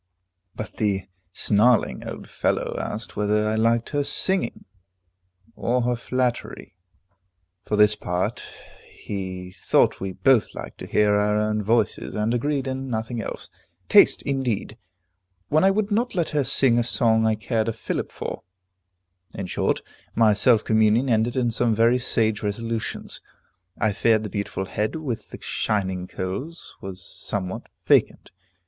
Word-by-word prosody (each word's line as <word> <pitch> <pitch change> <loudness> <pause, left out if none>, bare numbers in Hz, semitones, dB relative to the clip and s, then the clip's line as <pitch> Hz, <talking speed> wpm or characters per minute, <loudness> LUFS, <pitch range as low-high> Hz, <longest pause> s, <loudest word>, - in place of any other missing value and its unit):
But 110 - -7
the 100 -3 0 0.3
snarling 110 +4 +2
old - - -7
fellow - - -1
asked 110 +3 -5
whether 105 +1 +1
I 110 - 0
liked 115 +1 +2
her 145 -1 0
singing, 165 0 -1 0.9
or 125 +1 0
her 125 0 +1
flattery? 125 -4 -3 0.9
For 105 - -1
his 105 0 +6
part, 90 -2 -2 0.5
he 95 -2 -6
thought 95 - +2
we 95 -1 -4
both 130 +2 +3
liked - - -8
to - - -7
hear 105 -1 +3
our 105 +1 +2
own 105 0 0
voices, 110 +1 0
and 105 +2 0
agreed 140 +3 0
in 130 0 -4
nothing 115 0 -3
else. - - -7 0.4
Taste, - - +6
indeed! 125 -6 -2 0.7
when 155 +3 +3
I 190 - +6
would 205 +1 0
not 235 +2 0
let 170 -3 0
her 150 -2 +1
sing 125 -2 +3
a - - +2
song 115 -2 +2
I 110 - +2
cared 110 0 -1
a - - +1
fillip - - -4
for. - - -6 0.9
In 95 - -4
short, 90 - 0 0.3
my 110 -2 +5
self 110 +1 +4
communion 110 +4 +3
ended 115 +1 +2
in 120 -2 +1
some 115 -1 +2
very 115 +3 +4
sage 110 -3 +1
resolutions. 115 +2 -3 0.6
I 105 -1 +2
feared 110 +1 +2
the 105 - -5
beautiful 100 -2 -3
head 105 - -2
with 125 -9 -4
the - - -9
shining 95 -3 -2
curls 130 - -6
was 95 -1 -8 0.2
somewhat 95 -2 -4 0.2
vacant. - - +2
110 Hz, 150 wpm, -24 LUFS, 105-125 Hz, 0.9 s, his